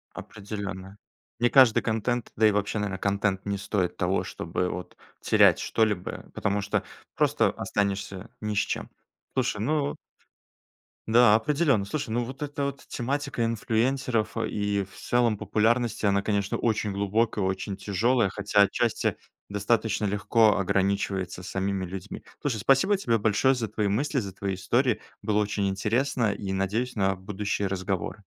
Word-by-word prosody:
Определенно. 100 -2 -7 0.4
Не 120 0 +3
каждый 130 -5 +6
контент, 115 +2 -1
да 110 +1 +5
и 105 - +4
вообще, 105 +1 -1
наверно, 100 -2 -2
контент 100 -1 0
не 100 0 -1
стоит 100 -3 -1
того, - - +1
чтобы 90 - -3
вот 90 0 -6 0.2
терять - - +5
что-либо, 105 -5 -1
потому 100 +1 -1
что 100 - -1 0.3
просто - - +3
останешься 100 0 -2
ни 105 -1 -3
с - - -3
чем. - - -2 0.4
Слушай, 120 -5 0
ну 145 +3 0 1.1
Да, 115 -1 +6
определённо. 140 -2 +2
Слушай, 115 +2 -4
ну, 120 +1 0
вот 130 +4 -8
эта 145 -1 -3
вот 140 -1 -4
тематика 135 0 -2
инфлюенсеров 115 +1 0
и 100 -1 -1
в - - -17
целом 120 -3 +1
популярности, 115 +1 +1
она, 100 0 +3
конечно, 100 -1 -1
очень 110 -3 0
глубокая, 105 +1 0
очень 95 +1 -2
тяжёлая, 110 +3 +1
хотя 100 +1 +2
отчасти 115 +2 +1 0.3
достаточно 105 +1 0
легко 105 +2 +3
ограничивается 95 -1 -1
самими 95 +1 -2
людьми. 95 0 -7 0.2
Слушай, 125 -7 -2
спасибо 165 - +4
тебе 115 -11 +1
большое 110 +5 +3
за 120 -4 -2
твои 105 -1 -1
мысли, 135 +7 0
за 100 -5 -5
твои 95 +1 -3
истории. 120 +6 +1 0.2
Было 105 -1 +1
очень 100 -1 0
интересно, 115 +4 0
и 95 -1 -4
надеюсь 110 +7 -1
на 95 -2 +1
будущие 100 +1 -2
разговоры. 95 +1 -3
105 Hz, 145 wpm, -27 LUFS, 100-120 Hz, 1.1 s, каждый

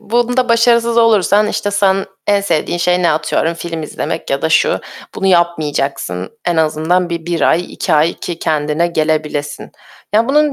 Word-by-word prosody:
bunda 240 +2 0
başarısız 235 0 +3
olursan, 215 -2 +3
işte 205 -1 -2
sen 195 -1 +1 0.2
en 205 -1 +3
sevdiğin 175 -2 -1
şey 180 +1 +1
ne 170 - +3
atıyorum? 160 +2 0
Film 165 -1 -5
izlemek 155 - -5
ya - - -1
da - - +1
şu, - - +2 0.3
bunu 195 - -2
yapmayacaksın. 150 - 0
En 175 -2 0
azından 160 +3 +1
bir 170 -1 -4
1 170 -1 -2
ay, 170 +2 +1
2 - - -2
ay 155 +2 +3
ki 170 -2 -6
kendine 150 +2 0
gelebilesin. 155 -3 -2 0.4
Ya, 225 +4 +3
bunun 300 +1 +3
175 Hz, 165 wpm, -15 LUFS, 155-210 Hz, 0.4 s, başarısız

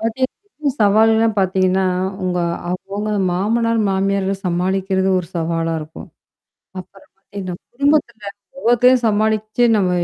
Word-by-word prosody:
பார்த்தீங்கன்னா 230 +4 -1 0.5
சவால்கள் 220 +2 +4
எல்லாம் 220 -1 +1
பார்த்தீங்கன்னா, 190 0 +1 0.4
உங்க 180 -1 -1 0.3
அவுங்க 200 +4 -4 0.2
மாமனார், 230 +5 0
மாமியார 195 0 0
சமாளிக்கிறது 190 +2 0
ஒரு 180 - -5
சவாலாக 165 0 -1
இருக்கும். 155 +1 -10 0.7
அப்புறம் 190 +1 -13
பார்த்தீங்கன்னா, 195 -2 -7 0.2
குடும்பத்தில 240 -6 0 0.3
ஒ்வ்வொருத்தரையும் 250 0 +3
சமாளிச்சு 215 +2 +1
நம்ம 190 -3 +1
200 Hz, 110 wpm, -19 LUFS, 185-225 Hz, 0.7 s, சவால்கள்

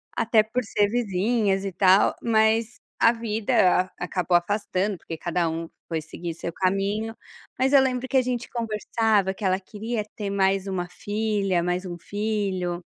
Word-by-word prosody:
Até 225 -1 +3
por 240 +3 -2
ser 205 0 +1
vizinhas 205 -2 0
e 195 - -2
tal 190 +1 +5
mas 225 +1 +2 0.2
a 230 - +6
vida 215 -5 +1
acabou 180 0 +1
afastando, 200 +1 -1
porque 165 -1 -7
cada 175 -1 -1
um 165 +1 -4 0.2
foi 160 -2 -2
seguir 165 +2 -6
seu 170 0 -5
caminho, 200 +4 -1 0.4
mas 265 +2 +1
eu 275 - +8
lembro 260 -1 -1
que 265 - -5
a - - +6
gente 245 -1 -3
conversava 220 -3 0
que 200 - -11
ela 185 0 +2
queria 215 +3 -4
ter 205 -2 -4
mais 195 0 +1
uma 180 -2 -2
filha, 205 -2 -1
mais 180 +1 -1
um 175 -1 -6
filho 195 -4 -2
205 Hz, 160 wpm, -25 LUFS, 185-225 Hz, 0.4 s, eu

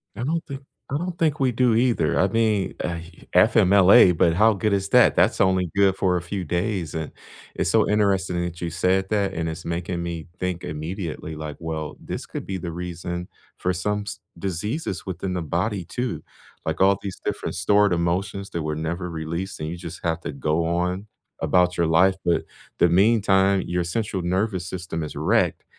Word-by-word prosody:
I 115 - -4
don't 165 +4 -1
think 135 0 -7 0.3
I 140 - +1
don't 175 +1 -4
think 155 -3 +1
we 130 -2 +2
do 120 -1 +2
either. 115 -9 +2
I 95 - +4
mean, 110 -2 +1
uh, 85 -1 -2 0.4
FMLA, 95 -2 +6
but 85 0 +4
how 110 +5 +5
good 105 +1 0
is 100 0 0
that? 125 +2 +5
That's - - +3
only 95 -2 +2
good 100 -1 +4
for 90 -2 +1
a - - -3
few 90 +2 -4
days. 90 -2 -2
And 80 -1 -4 0.4
it's - - -1
so - - +3
interesting 95 -4 +1
that 85 -1 -5
you 85 -1 -3
said 95 +3 +1
that, 100 -3 0
and 80 0 -2
it's 80 0 -5
making 85 +1 -3
me 85 -2 -4
think 90 -1 -2
immediately, 80 0 -5
like, 75 -1 -6
well, 80 -2 -4
this - - -5
could - - -7
be 95 - -3
the 85 -1 -5
reason 90 +1 -5 0.3
for 90 - 0
some 105 +4 -1
s - - -5 0.2
diseases 105 - -3
within 95 0 -4
the 90 -2 -2
body 90 +4 -1
too, 120 -10 -4 0.4
like - - -2
all 100 +1 +5
these 100 -2 -6
different - - -3
stored 100 +3 +3
emotions 90 +3 -1
that 85 - -3
were 75 0 -2
never 85 +3 -3
released, 85 +4 -4
and 75 0 -3
you 85 - -5
just 85 0 -8
have 80 -1 -1
to 80 - -4
go 75 +3 0
on 90 +3 -1 0.3
about 90 0 +2
your 85 - +3
life. 90 +4 +4
But 85 -2 +1 0.3
the 85 - +5
meantime, 95 0 +4
your 90 0 0
central 95 +1 -2
nervous 95 0 -1
system 85 -2 -4
is 75 - -6
wrecked. - - +1
90 Hz, 195 wpm, -24 LUFS, 85-100 Hz, 0.4 s, FMLA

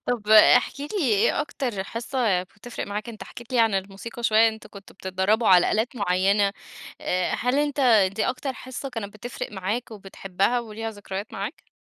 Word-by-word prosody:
طب، 225 -4 -2
احكِ 240 +5 +6
لي، 290 - -5
إيه 220 -3 +2
أكتر 250 -8 -3
حصة 230 -4 -1
بتفرق 205 +6 -8
معاك؟ 210 +3 -5
أنت 225 -2 -8
حكيت 240 +2 -12
لي 250 - +2
عن 225 -3 +3
الموسيقى 195 +5 -5
شوية، 225 0 +5
أنتم 220 -1 -8
كنتم 200 -1 -13
بتتدربوا 190 +5 0
على 180 -2 +6
آلات 225 +4 -1
معينة 200 0 +2 0.5
آآ، 180 0 0
هل 250 +3 0
أنت 290 -1 0 0.3
دي 215 - 0
أكتر 265 +1 -3
حصة 260 +1 -7
كانت 225 -5 -6
بتفرق 240 0 -7
معاك 210 +6 -3
وبتحبها 195 +2 -2
وليها 225 -1 -6
ذكريات 205 -1 -7
معاك؟ - - -6
220 Hz, 165 wpm, -24 LUFS, 195-245 Hz, 0.5 s, احكِ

